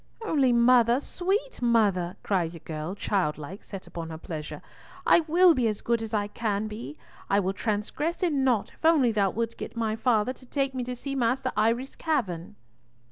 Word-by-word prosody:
"Only, 275 - +3
mother, 240 0 +5
sweet 390 - -2
mother," 205 -7 +2
cried 175 -5 0
the 165 - -9
girl, 155 +4 -5
childlike, 180 -3 -2
set 195 -2 -8
upon 165 -1 -7
her 160 - -6
pleasure, 155 -2 -7 0.4
"I - - +6
will 350 +2 +6
be 250 -5 +1
as 215 -2 -2
good 235 -1 0
as 225 0 -3 0.2
can 215 -2 -1
be. 230 +8 -7 0.3
I 200 - +4
will 190 -1 0
transgress 225 - -2
in 295 -6 +2
nought 245 -6 +1
if - - -27
only 310 -7 +5
thou 200 -3 +2
wilt 230 +3 -3
get - - -7
my 220 -1 0
father 225 0 +1
to 260 - -17
take 275 0 -1
me 255 -1 -2
to 250 0 -4
see 275 +3 -5
Master 255 +1 0
Eyre's 230 +5 +1
cavern." 205 - -2
230 Hz, 185 wpm, -27 LUFS, 200-265 Hz, 0.4 s, I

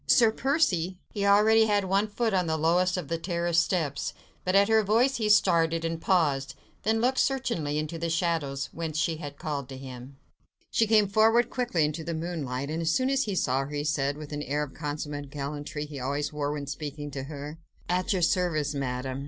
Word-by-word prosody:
"Sir 230 -3 +5
Percy!" 190 - +1
He 200 -2 -1
already 220 +2 +6
had 205 -2 +2
one 195 +3 +2
foot 220 +1 -1
on 180 -2 +1
the 160 0 0
lowest 180 +4 +2
of 175 -5 -4
the 165 +3 -2
terrace 170 -1 +1
steps, 160 -5 -1 0.3
but 185 +1 0
at 200 0 +6
her 220 0 +4
voice 230 +6 +2
he 215 -2 0
started, 165 -5 +3
and 165 0 -3
paused, 150 -8 +1 0.3
then 220 +2 +1
looked 255 +2 +2
searchingly 230 - 0
into 155 +2 -3
the 170 0 -2
shadows 160 -5 -1
whence 160 -2 -4
she 160 0 0
had 145 -3 -8
called 145 -4 -4
to 135 - -7
him. 130 0 -10 0.5
She 225 - +2
came 215 -2 +4
forward 225 +4 +3
quickly 235 -11 +1
into 155 +2 -3
the 165 +1 -3
moonlight, 150 -5 -3
and, 160 +1 -2
as 165 - 0
soon 255 +10 +2
as 275 0 +2
he 205 -3 -2
saw 130 -6 +1
her, 145 +2 -7
he 145 - -1
said, 145 -2 0
with 150 -1 -9
that 145 0 -3
air 150 +1 0
of 140 - -8
consummate 145 -2 -5
gallantry 145 +1 -5
he 145 -2 -8
always 145 +3 -2
wore 145 -1 -1
when 145 -1 -4
speaking 145 +1 -6
to 135 -1 -5
her,— 150 +2 -7 0.3
"At 180 +4 0
your 185 -3 +1
service, 165 -4 +1
Madame!" 130 -1 -3
165 Hz, 210 wpm, -27 LUFS, 145-195 Hz, 0.5 s, already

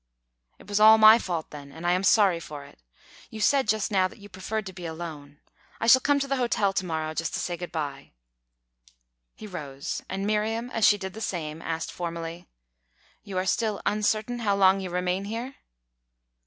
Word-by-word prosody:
"It - - -17
was 205 0 0
all 220 +1 +8
my 220 +1 +8
fault, 170 -7 -4
then, 145 -1 -10
and 160 +4 -9
I 175 - +3
am 185 +1 +1
sorry 195 -4 +4
for 150 -3 -9
it. 140 - -18 0.5
You 220 - -8
said 265 +5 +3
just 215 0 0
now 190 -2 +3
that - - -16
you 205 0 -13
preferred 205 +3 -4
to 190 - -7
be 175 -2 -7
alone. 155 -3 -8 0.4
I - - -1
shall 260 +3 +7
come 285 +1 +2
to 275 - -2
the 275 0 0
hotel 220 -5 +1
to 190 - -1
morrow, 160 -1 -3
just 165 0 -3
to - - -2
say 175 - -2
good 175 +1 -7
bye." 140 -4 -5 1.3
He 215 - -10
rose; 145 -6 -6
and 195 +1 -3
Miriam, 220 +3 -1
as 225 -3 +3
she 205 - +5
did 190 -2 -6
the 220 - -9
same, 165 -6 -4
asked 165 0 -4
formally: 170 0 -6 0.7
"You 195 -3 -7
are 185 - 0
still 215 +1 0
uncertain 215 +3 0
how 205 -4 +1
long 195 0 +4
you 190 -1 -5
remain 180 +2 -1
here?" 235 +6 -5
190 Hz, 200 wpm, -26 LUFS, 165-215 Hz, 1.3 s, all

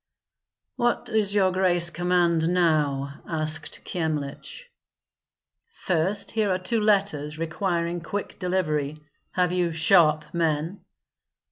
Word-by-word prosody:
"What 240 0 0
does 210 -2 0
your 190 -2 +3
grace 175 -2 +4
command 175 -2 +1
now?" 150 -6 0
asked 155 -2 0
Kyemlich. 155 - -4 1.1
"First, 190 - -1
here 215 -2 0
are 185 - +1
two 205 +5 -1
letters, 195 -8 +1
requiring 170 +1 -2
quick 200 +5 -5
delivery. 155 -6 -1 0.3
Have 180 -1 +1
you 180 -2 0
sharp 160 -1 +3
men?" 165 +2 -1
170 Hz, 105 wpm, -25 LUFS, 155-185 Hz, 1.1 s, grace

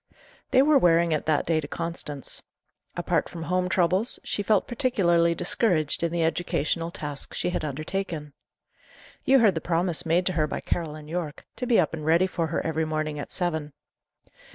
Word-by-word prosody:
They 260 - +5
were 295 -1 +5
wearing 170 -3 +4
it 155 -1 -1
that 155 -2 +2
day 160 -1 +2
to 145 - -7
Constance. 165 -4 -5 0.5
Apart - - 0
from 165 -2 -7
home 180 +2 0
troubles, 185 +5 +1
she - - -2
felt 210 0 +2
particularly 175 -10 +2
discouraged 165 -5 +1
in 170 -1 0
the 170 -1 0
educational 165 0 0
task 145 -4 -5
she 180 - -1
had - - -2
undertaken. 155 +1 -4 0.9
You 270 - +6
heard 220 -6 +5
the 160 - -3
promise 175 0 0
made 170 +2 +2
to 185 - +1
her 155 -2 +1
by - - -3
Caroline 155 -3 -3
Yorke, 160 -2 -4
to 250 - -3
be 235 - +4
up 165 - +1
and 155 -2 -5
ready 165 +4 +4
for 170 -3 -2
her 160 - -2
every 160 0 0
morning 155 -1 -2
at 145 - -6
seven. 160 -5 -1
170 Hz, 180 wpm, -26 LUFS, 155-180 Hz, 0.9 s, You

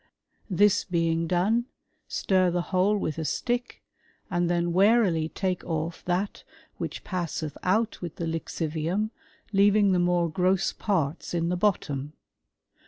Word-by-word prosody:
This 205 +2 +4
being 165 -2 0
done, 200 +8 +2 0.4
stir 185 -2 +2
the 175 0 0
whole 195 +3 +3
with 155 -5 -3
a - - -2
stick, 245 +8 -2 0.5
and 175 -1 +1
then 175 -1 +1
warily 190 -5 +4
take 185 -1 -2
off 160 0 -3
that 180 +3 -1 0.4
which - - -5
passeth 165 -5 -3
out 215 +5 +1
with 175 -3 -6
the 170 - -3
lixivium, 165 +5 -2 0.4
leaving 200 0 +5
the 180 - +3
more 175 -1 +2
gross 185 +3 +1
parts 170 -5 -1
in 170 0 0
the 180 - +1
bottom. 150 -7 -1
180 Hz, 135 wpm, -27 LUFS, 165-195 Hz, 0.5 s, leaving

